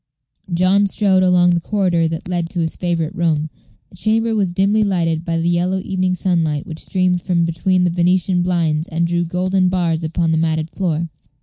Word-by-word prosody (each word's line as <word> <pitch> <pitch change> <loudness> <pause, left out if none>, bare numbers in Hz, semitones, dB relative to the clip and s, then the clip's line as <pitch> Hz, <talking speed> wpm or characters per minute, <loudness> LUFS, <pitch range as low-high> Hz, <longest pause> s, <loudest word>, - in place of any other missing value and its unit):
John 185 +4 +3
strode 190 -1 +2
along 180 -1 +4
the 175 - +2
corridor 175 -3 0
that 160 +1 -5
led 175 -2 -2
to 175 - -4
his 165 -1 -1
favorite 170 -2 -2
room. 160 -4 -1 0.4
The 185 - -16
chamber 225 +3 +1
was 200 -5 0
dimly 200 +4 +2
lighted 170 -5 0
by 170 -1 -2
the 165 - -1
yellow 175 +2 +1
evening 185 -1 -1
sunlight 165 -5 -1
which 160 -1 -7
streamed 180 -2 0
from 170 -1 0
between 180 +2 0
the 175 - +1
Venetian 180 +1 +1
blinds 165 -3 0
and 170 +1 -1
drew 175 0 0
golden 185 +2 0
bars 170 -3 -1
upon 165 +1 -1
the 160 - +1
matted 160 0 -1
floor. 170 -3 -2
175 Hz, 190 wpm, -18 LUFS, 165-185 Hz, 0.4 s, along